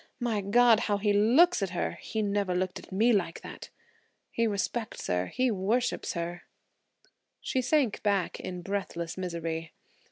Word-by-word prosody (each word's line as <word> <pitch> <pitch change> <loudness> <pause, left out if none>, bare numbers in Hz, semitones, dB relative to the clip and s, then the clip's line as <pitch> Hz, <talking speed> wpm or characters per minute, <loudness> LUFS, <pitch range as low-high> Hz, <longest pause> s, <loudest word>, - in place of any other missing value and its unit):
My 230 -4 0
God! 225 +3 +5
how 205 - +2
he 205 0 +1
looks 250 +11 +5
at 195 - 0
her–he 215 +4 -3
never 200 -3 0
looked 185 0 -1
at - - -15
me 225 +5 +3
like 175 -5 -1
that! - - -9 0.6
He 230 0 +1
respects 215 +2 -3
her; 90 +1 0
he 255 -1 0
worships 220 +6 0
her–" 175 0 -4 1.0
She 260 - -1
sank 255 -3 +1
back 200 -4 0
in 180 -1 -6
breathless 185 -4 -3
misery. 165 -3 -4
200 Hz, 150 wpm, -29 LUFS, 180-230 Hz, 1.0 s, God